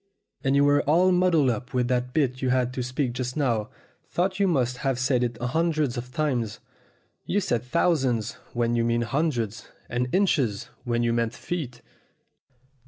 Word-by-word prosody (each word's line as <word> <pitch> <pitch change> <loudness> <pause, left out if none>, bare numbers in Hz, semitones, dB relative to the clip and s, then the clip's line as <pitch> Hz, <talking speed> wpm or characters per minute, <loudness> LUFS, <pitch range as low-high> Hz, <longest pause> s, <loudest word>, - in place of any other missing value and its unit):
"And 135 0 +2
you 140 - +5
were 145 0 +4
all 180 +4 +5
muddled 175 -7 +3
up 125 +3 -5
with 125 -1 +2
that 125 0 0
bit 130 -2 0
you 130 - +1
had 125 -1 +1
to 130 - -3
speak 125 0 -2
just 125 +1 -4
now, 115 -7 0 0.5
though 185 +2 +2
you 195 +1 +1
must 130 -7 +1
have 135 -1 -1
said 125 0 +1
it 120 -1 -2
hundreds 150 +1 0
of 125 +1 -6
times. 125 -7 -1 0.7
You 205 - +2
said 120 - 0
thousands 130 - +1 0.2
when 120 0 +1
you 115 - +2
meant 120 0 +1
hundreds, 125 -8 -1 0.2
and 125 +1 -1
inches 140 - +1 0.2
when 120 -1 0
you 115 0 +1
meant 115 0 0
feet. 135 -9 -5
125 Hz, 170 wpm, -26 LUFS, 120-150 Hz, 0.7 s, you